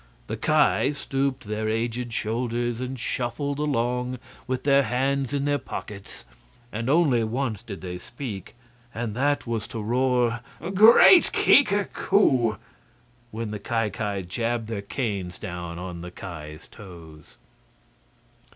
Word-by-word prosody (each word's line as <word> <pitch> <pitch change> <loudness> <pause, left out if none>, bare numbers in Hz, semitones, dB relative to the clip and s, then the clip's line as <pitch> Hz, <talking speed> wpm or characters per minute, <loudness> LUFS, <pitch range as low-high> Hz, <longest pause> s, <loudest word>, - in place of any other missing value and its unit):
The - - -4
Ki 140 - +2
stooped 135 -1 -2
their 110 0 -2
aged 115 +2 -2
shoulders 120 +1 -2
and 130 +1 -4
shuffled 130 +4 -2
along 125 -3 -1 0.3
with 130 0 -2
their 140 -1 +5
hands 135 +1 0
in 140 -1 -1
their 145 0 +1
pockets, 105 -5 -8 0.5
and 115 +4 -3
only 140 -7 +4
once 115 -2 -2
did 100 -3 -8
they 90 -1 -6
speak, 120 -3 -8 0.4
and 115 -2 -3
that 145 +3 +1
was 115 -3 -3
to 115 - -6
roar 120 +1 +1 0.3
"Great 225 - +8
Kika 205 -8 +4
koo!" 130 - +2 0.7
when 115 -1 -5
the 105 - -4
Ki 115 +1 -1
Ki 100 -3 -3
jabbed 115 +5 -2
their 110 -3 -3
canes 100 -5 -3
down 85 -4 -6
on 90 -1 -6
the 90 - -7
Ki's 75 -4 -9
toes. 80 -6 -13
115 Hz, 135 wpm, -25 LUFS, 105-130 Hz, 0.7 s, Great